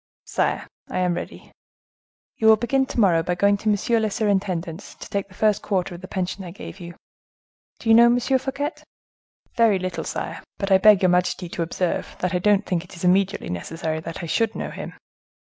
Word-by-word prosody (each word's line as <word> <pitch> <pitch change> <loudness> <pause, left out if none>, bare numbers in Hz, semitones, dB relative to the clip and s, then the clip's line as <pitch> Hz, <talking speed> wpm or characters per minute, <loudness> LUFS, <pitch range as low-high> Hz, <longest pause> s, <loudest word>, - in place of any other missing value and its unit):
"Sire, - - -1 0.2
I - - -3
am 180 -1 +1
ready." 175 - -7 0.9
"You 220 - +2
will 220 - +9
begin 260 +4 0
to - - -3
morrow 180 -6 +4
by 180 +2 -1
going 200 +3 +3
to 215 - -1
monsieur 220 +3 +2
le 220 -1 0
surintendant's 190 -5 -2
to - - -10
take 200 -1 -2
the 185 - -18
first 215 -1 +2
quarter 185 -2 -1
of 175 - -9
the 185 - -8
pension 190 0 -3
I 180 - -7
give 195 +2 -10
you. 175 -1 -9 0.8
Do - - -9
you 225 - +6
know 235 +1 +8
M. 240 +1 +3
Fouquet?" 270 +3 -1 0.8
"Very 230 -4 +4
little, 185 -3 -4
sire; 165 - -5 0.2
but 195 0 -3
I 190 - +6
beg 210 -1 +6
your 185 - +5
majesty 180 0 +1
to 170 - -4
observe 170 +1 -2
that 180 +1 -2
I 180 - +1
don't 205 +2 +3
think 175 -3 -1
it 180 -1 -12
immediately 190 - +2
necessary 160 - -3
that 165 +1 -7
I - - -3
should 225 +6 0
know - - -4
him." - - -7
190 Hz, 205 wpm, -23 LUFS, 175-215 Hz, 0.9 s, will